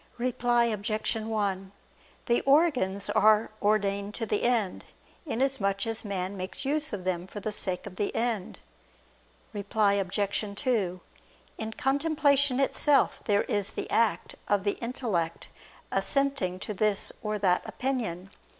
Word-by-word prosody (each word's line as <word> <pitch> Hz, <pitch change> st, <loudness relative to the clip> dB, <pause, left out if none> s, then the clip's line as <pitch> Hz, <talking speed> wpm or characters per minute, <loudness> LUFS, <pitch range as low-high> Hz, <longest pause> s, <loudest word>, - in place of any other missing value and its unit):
Reply 240 Hz, -1 st, +2 dB
Obj. 215 Hz, 0 st, -1 dB
1: 205 Hz, -4 st, -2 dB, 0.5 s
The 235 Hz, -1 st, +2 dB
organs 260 Hz, -, +3 dB
are 215 Hz, +1 st, +4 dB
ordained 205 Hz, -1 st, +1 dB
to 225 Hz, -, -2 dB
the 210 Hz, -1 st, 0 dB
end, 230 Hz, -6 st, 0 dB, 0.4 s
inasmuch 225 Hz, -7 st, 0 dB
as 225 Hz, 0 st, -3 dB
man 195 Hz, -2 st, -3 dB
makes 185 Hz, +7 st, -5 dB
use 305 Hz, +2 st, +1 dB
of 200 Hz, -3 st, -4 dB
them 180 Hz, -1 st, -2 dB
for 205 Hz, -, -7 dB
the 215 Hz, +1 st, -3 dB
sake 185 Hz, -3 st, 0 dB
of 185 Hz, -, -9 dB
the 205 Hz, -, -1 dB
end. 225 Hz, -5 st, -2 dB, 0.9 s
Reply 205 Hz, 0 st, +1 dB
Obj. 200 Hz, +1 st, -1 dB
2: 200 Hz, -10 st, 0 dB, 0.6 s
In 220 Hz, 0 st, -3 dB
contemplation 285 Hz, 0 st, +2 dB
itself 280 Hz, +1 st, +3 dB
there 205 Hz, -2 st, +3 dB
is 205 Hz, -1 st, -2 dB
the -, -, -4 dB
act 230 Hz, -2 st, +1 dB
of 205 Hz, -2 st, +2 dB
the 205 Hz, -, -1 dB
intellect 215 Hz, -9 st, -2 dB, 0.4 s
assenting 275 Hz, -10 st, 0 dB
to 210 Hz, -, -4 dB
this 210 Hz, 0 st, +1 dB
or 210 Hz, -1 st, -2 dB
that 185 Hz, -3 st, +2 dB
opinion. 215 Hz, -9 st, -3 dB
210 Hz, 135 wpm, -28 LUFS, 195-245 Hz, 0.9 s, are